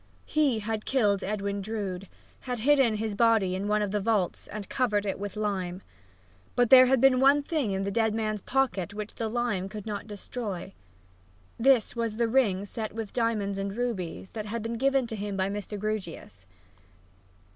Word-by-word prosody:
He 290 -6 +2
had 215 0 -3
killed 210 -7 +2
Edwin 200 0 -2
Drood, 195 -3 -4 0.3
had 250 -1 -4
hidden 260 -1 +4
his 215 0 -2
body 220 -4 +3
in 190 +2 -2
one 210 0 +2
of 205 - -2
the 210 - 0
vaults 205 -3 0
and 210 -2 -7
covered 210 -6 0
it 195 - -2
with 205 -1 -5
lime. 195 -3 -2 0.7
But 245 -2 +2
there 255 -1 +10
had 265 0 +3
been 260 0 +5
one 280 +2 +5
thing 290 -7 -1
in 195 0 -1
the 200 - -2
dead 220 0 +1
man's 215 -2 -1
pocket 205 -8 0
which 210 0 -5
the 225 - -3
lime 220 -5 -1
could 210 0 -7
not 210 -1 -5
destroy: 205 -3 -5 0.9
this 250 -1 +4
was 230 -2 -2
the 235 +1 +1
ring 220 -6 +2
set 215 +2 -5
with 220 -2 -5
diamonds 215 -4 0
and 195 +2 -4
rubies, 195 -7 -3
that 215 -2 -6
had 225 +1 -3
been 230 0 -3
given 270 -1 +2
to 230 - -5
him 205 -1 -4
by 190 0 0
Mr. 205 +1 -5
Grewgious. 185 - -5
215 Hz, 185 wpm, -28 LUFS, 200-235 Hz, 0.9 s, there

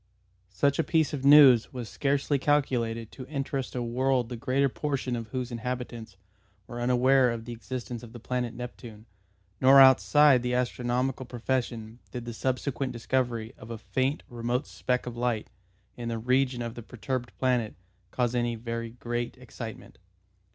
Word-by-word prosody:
Such 140 - +1
a - - +4
piece 160 -2 +1
of 135 -3 -3
news 140 -5 +7
was 125 -3 -5
scarcely 140 +2 0
calculated 120 -6 0
to 130 -2 -9
interest 135 -2 -3
a 125 - -1
world 125 0 0
the 125 - -4
greater 130 +4 +1
portion 135 -2 -2
of 115 -2 -5
whose 125 0 -4
inhabitants 120 -3 -5 0.5
were 120 +2 -7
unaware 125 +1 +4
of 115 -1 -4
the 120 - -6
existence 120 +1 -6
of 120 - -11
the 120 - -10
planet 125 0 -3
Neptune, 120 -3 -9 0.6
nor 135 +1 +8
outside 130 +2 +6
the 125 0 -1
astronomical 125 +1 -1
profession 120 -2 -3
did 120 -2 -6
the 120 - -5
subsequent 130 +2 -2
discovery 120 -2 -1
of 110 - -11
a 115 - -5
faint 130 +6 -1
remote 120 +3 -2
speck 125 0 -2
of 125 -1 -6
light 120 -3 -1 0.4
in 120 -1 -5
the 115 - -2
region 125 +1 +1
of 115 -1 -5
the 120 - -8
perturbed 125 +2 -4
planet 125 -4 0 0.3
cause 120 -1 0
any 120 -1 0
very 115 0 -4
great 120 0 -4
excitement. - - -9
125 Hz, 160 wpm, -28 LUFS, 115-130 Hz, 0.6 s, nor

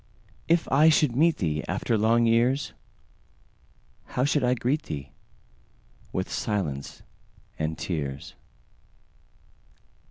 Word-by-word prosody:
If 165 0 +2
I 150 +4 +6
should 150 -5 +3
meet 160 +4 +3
theeAfter 90 +7 -1
long 115 +2 +3
years, 120 +4 +2 1.3
How 125 - -1
should 145 -1 +1
I 125 0 +3
greet 130 +6 0
thee?—With 70 -3 -9
silence 75 -10 -3 0.6
and 80 0 -2
tears. 75 -5 -4
115 Hz, 90 wpm, -26 LUFS, -, 1.3 s, I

